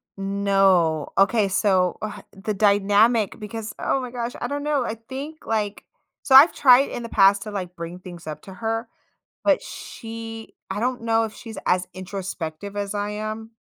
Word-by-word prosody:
No. 195 Hz, -5 st, +2 dB
Okay. 200 Hz, +1 st, +4 dB
So, 185 Hz, -2 st, +2 dB
uh, 205 Hz, -1 st, -5 dB, 0.2 s
the 205 Hz, +2 st, -3 dB
dynamic 205 Hz, +2 st, +3 dB
because 215 Hz, 0 st, -6 dB
oh -, -, 0 dB
my 250 Hz, -2 st, -6 dB
gosh. 240 Hz, 0 st, -4 dB
I -, -, -2 dB
don't 285 Hz, 0 st, -3 dB
know. 295 Hz, -3 st, +1 dB
I 225 Hz, -, -3 dB
think, 285 Hz, +4 st, -6 dB
like 210 Hz, -2 st, -2 dB, 0.4 s
so 265 Hz, -, +3 dB
I've 290 Hz, +6 st, +9 dB
tried 260 Hz, 0 st, +6 dB
in -, -, -5 dB
the 230 Hz, -, -6 dB
past 195 Hz, -1 st, +5 dB
to, 215 Hz, -, -7 dB
like, 180 Hz, -3 st, -5 dB
bring 170 Hz, +1 st, -7 dB
things 175 Hz, -3 st, -11 dB
up 155 Hz, -, -6 dB
to 190 Hz, -, -10 dB
her, 225 Hz, +3 st, -3 dB, 0.6 s
but -, -, +3 dB
she 225 Hz, 0 st, -8 dB, 0.2 s
I 190 Hz, +2 st, -3 dB
don't 250 Hz, +2 st, -1 dB
know 225 Hz, 0 st, +2 dB
if 215 Hz, -, -8 dB
she's 225 Hz, -2 st, -9 dB
as 180 Hz, 0 st, +2 dB
introspective 185 Hz, -1 st, -6 dB
as 200 Hz, 0 st, -2 dB
I 205 Hz, 0 st, -1 dB
am, 215 Hz, +1 st, -5 dB
210 Hz, 180 wpm, -23 LUFS, 195-230 Hz, 0.6 s, I've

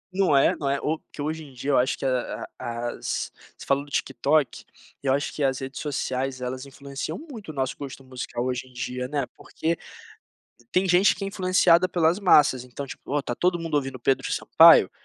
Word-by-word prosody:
Não 185 Hz, -8 st, +4 dB
é? -, -, +4 dB
Não 140 Hz, -2 st, -2 dB
é? 140 Hz, 0 st, 0 dB
O 155 Hz, +1 st, -1 dB
que -, -, -7 dB
hoje 160 Hz, +1 st, -3 dB
em 140 Hz, -, -13 dB
dia 135 Hz, +3 st, -3 dB
eu -, -, +4 dB
acho 130 Hz, -, +1 dB
que -, -, -5 dB
a 130 Hz, -2 st, -2 dB
a 120 Hz, 0 st, -3 dB
as -, -, -3 dB, 0.3 s
você -, -, -10 dB
falou 140 Hz, +1 st, +1 dB
do 145 Hz, -, -15 dB
TikTok, 140 Hz, +1 st, 0 dB, 0.4 s
eu 135 Hz, -1 st, +1 dB
acho 140 Hz, +2 st, 0 dB
que 150 Hz, -, -2 dB
as 130 Hz, -1 st, +2 dB
redes 135 Hz, 0 st, -6 dB
sociais 130 Hz, -2 st, -2 dB
elas 130 Hz, +2 st, -5 dB
influenciam 140 Hz, 0 st, -6 dB
muito 250 Hz, -, -10 dB
o -, -, -5 dB
nosso 130 Hz, -1 st, -2 dB
gosto 135 Hz, -1 st, -8 dB
musical 125 Hz, -1 st, -5 dB
hoje 130 Hz, 0 st, -2 dB
em 125 Hz, -, -19 dB
dia, 125 Hz, +1 st, -4 dB
né, 140 Hz, -2 st, -1 dB
porque 165 Hz, +1 st, -2 dB, 1.0 s
tem 185 Hz, +1 st, +2 dB
gente 180 Hz, +3 st, +5 dB
que 200 Hz, -, -5 dB
é -, -, -2 dB
influenciada 185 Hz, -2 st, +4 dB
pelas 170 Hz, +1 st, +2 dB
massas, 145 Hz, -9 st, +4 dB
então 125 Hz, +3 st, -7 dB
tipo: 135 Hz, -, -9 dB
"Ó, 145 Hz, -1 st, +1 dB
tá 120 Hz, -, -3 dB
todo 175 Hz, -1 st, +1 dB
mundo 165 Hz, -2 st, -4 dB
ouvindo 135 Hz, -3 st, -1 dB
Pedro 135 Hz, +2 st, +1 dB
Sampaio, -, -, +7 dB
140 Hz, 210 wpm, -25 LUFS, 130-160 Hz, 1.0 s, Sampaio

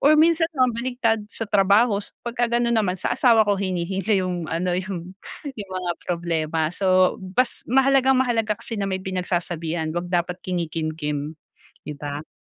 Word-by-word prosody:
or 300 Hz, +2 st, +5 dB
minsan 325 Hz, +1 st, +4 dB
naman 255 Hz, -1 st, +3 dB
baligtad 235 Hz, -2 st, 0 dB
sa 225 Hz, -, -3 dB
trabaho 205 Hz, +2 st, +4 dB
s -, -, -11 dB, 0.2 s
pagka 235 Hz, 0 st, -1 dB
gano'n 235 Hz, 0 st, +1 dB
naman 190 Hz, -4 st, +1 dB
sa -, -, 0 dB
asawa 230 Hz, -3 st, +5 dB
ko 205 Hz, -, +3 dB
hinihinga 190 Hz, +2 st, -1 dB
yung 180 Hz, -3 st, -3 dB
ano, 175 Hz, +2 st, -1 dB
yung, 185 Hz, -1 st, -4 dB, 0.3 s
yung 220 Hz, -9 st, -7 dB
mga 180 Hz, -1 st, -1 dB, 0.2 s
problema. 165 Hz, -2 st, -1 dB
So, 185 Hz, -1 st, +3 dB
bas 195 Hz, +7 st, 0 dB
mahalagang-mahalaga 260 Hz, -4 st, +3 dB
kasi 230 Hz, -2 st, -6 dB
na 195 Hz, -, -1 dB
may 190 Hz, -1 st, -2 dB
pinagsasabihan, 175 Hz, -3 st, -2 dB
wag 175 Hz, +1 st, -3 dB
dapat 180 Hz, 0 st, -1 dB
kinikimkim, 155 Hz, -3 st, -3 dB, 0.5 s
'di 150 Hz, -, -4 dB
ba? 145 Hz, +1 st, -6 dB
190 Hz, 155 wpm, -23 LUFS, 175-235 Hz, 0.5 s, or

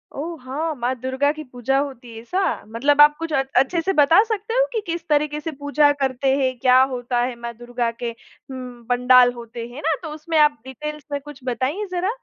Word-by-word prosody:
ओह! 325 Hz, +2 st, -5 dB
हाँ। 305 Hz, +5 st, -3 dB
माँ 245 Hz, 0 st, -1 dB
दुर्गा 260 Hz, +3 st, 0 dB
की 310 Hz, 0 st, -7 dB
पूजा 255 Hz, 0 st, -1 dB
होती 260 Hz, -4 st, -5 dB
है, 225 Hz, -, -8 dB
ऐसा? 360 Hz, +12 st, -2 dB, 0.3 s
मतलब 280 Hz, +6 st, +3 dB
आप 295 Hz, 0 st, +7 dB
कुछ 330 Hz, -1 st, -4 dB
अ 270 Hz, -2 st, +2 dB
अच्छे 300 Hz, +7 st, +3 dB
से 385 Hz, +3 st, 0 dB
बता 305 Hz, +5 st, +6 dB
सकते 440 Hz, 0 st, -3 dB
हो -, -, +3 dB
कि 445 Hz, -, -1 dB
किस 335 Hz, 0 st, -4 dB
तरीके 300 Hz, 0 st, +1 dB
से 325 Hz, +1 st, -5 dB
पूजा 290 Hz, +1 st, +3 dB
करते 265 Hz, 0 st, +1 dB
हैं, 260 Hz, -2 st, 0 dB
क्या 255 Hz, +1 st, +5 dB
होता 245 Hz, 0 st, -2 dB
है 245 Hz, 0 st, -1 dB
माँ 235 Hz, 0 st, -6 dB
दुर्गा 240 Hz, 0 st, -2 dB
के 235 Hz, 0 st, -5 dB
उँ, 250 Hz, +1 st, -11 dB
पंडाल 250 Hz, 0 st, +5 dB
होते 235 Hz, -1 st, -8 dB
हैं, 240 Hz, -, -14 dB
हैं 295 Hz, -, -7 dB
ना? 320 Hz, -1 st, +2 dB
तो 315 Hz, -, -5 dB
उसमें 315 Hz, +1 st, -2 dB
आप 295 Hz, -2 st, +4 dB
डिटेल्स 300 Hz, +2 st, -7 dB
में 285 Hz, -, -1 dB
कुछ 295 Hz, -1 st, -11 dB
बताइए 270 Hz, -, -1 dB
ज़रा। 365 Hz, +2 st, -1 dB
275 Hz, 220 wpm, -22 LUFS, 245-305 Hz, 0.3 s, आप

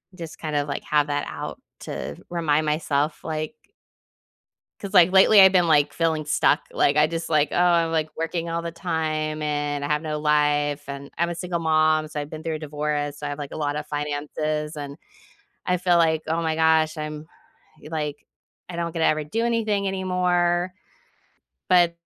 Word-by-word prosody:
just 165 Hz, -3 st, -8 dB
kinda, 150 Hz, -2 st, -2 dB
like, 140 Hz, -, -4 dB
have 150 Hz, -1 st, +2 dB
that 145 Hz, 0 st, -1 dB
out -, -, -6 dB, 0.2 s
to -, -, -5 dB
remind 155 Hz, -3 st, +1 dB
myself, 150 Hz, -1 st, -1 dB
like 155 Hz, +6 st, -4 dB, 1.3 s
'Cause, 200 Hz, 0 st, -6 dB
like, 180 Hz, -1 st, +7 dB
lately, 195 Hz, +2 st, +7 dB
I've 190 Hz, -1 st, +9 dB
been, 180 Hz, -2 st, +3 dB
like, 150 Hz, -3 st, +3 dB
feeling 160 Hz, -2 st, 0 dB
stuck. 150 Hz, 0 st, +2 dB
Like, 145 Hz, +1 st, +2 dB
I 150 Hz, -, +6 dB
just, 165 Hz, +1 st, -4 dB
"Oh, 160 Hz, -, +1 dB
I'm, 170 Hz, +2 st, +3 dB
like, 155 Hz, -1 st, 0 dB
working 165 Hz, +1 st, -2 dB
all 170 Hz, 0 st, -2 dB
the 170 Hz, -, -4 dB
time, 155 Hz, -2 st, -2 dB
and 145 Hz, -1 st, -2 dB
I -, -, -2 dB
have 150 Hz, 0 st, 0 dB
no 155 Hz, -1 st, -3 dB
life, 150 Hz, -1 st, +1 dB
and 140 Hz, 0 st, -7 dB
I'm 170 Hz, 0 st, +2 dB
a 175 Hz, -, -4 dB
single 175 Hz, 0 st, -3 dB
mom, 155 Hz, -1 st, +2 dB
so 150 Hz, -1 st, -5 dB
I've 145 Hz, 0 st, -6 dB
been 155 Hz, -, -7 dB
through 160 Hz, 0 st, -3 dB
a -, -, -5 dB
divorce. 145 Hz, -1 st, -3 dB
So 150 Hz, -, -4 dB
I -, -, -3 dB
have, 145 Hz, -, -5 dB
like, 145 Hz, -1 st, -6 dB
a -, -, -6 dB
lotta 150 Hz, 0 st, -2 dB
finances," 150 Hz, +1 st, -3 dB
and 145 Hz, -1 st, -7 dB, 0.7 s
I 180 Hz, 0 st, +1 dB
feel 180 Hz, 0 st, +3 dB
like, 160 Hz, -2 st, +3 dB
"Oh 165 Hz, +1 st, 0 dB
my 160 Hz, -1 st, -1 dB
gosh. 160 Hz, 0 st, +3 dB
I'm" 150 Hz, 0 st, -6 dB, 0.6 s
like, 150 Hz, -2 st, -3 dB, 0.5 s
"I 175 Hz, -, -7 dB
don't 170 Hz, -1 st, -2 dB
get 165 Hz, -, -4 dB
to -, -, +4 dB
ever 155 Hz, 0 st, +1 dB
do 225 Hz, +10 st, -1 dB
anything 215 Hz, -4 st, 0 dB
anymore," 180 Hz, -1 st, 0 dB, 1.0 s
but 175 Hz, -2 st, +4 dB
155 Hz, 185 wpm, -24 LUFS, 150-170 Hz, 1.3 s, I've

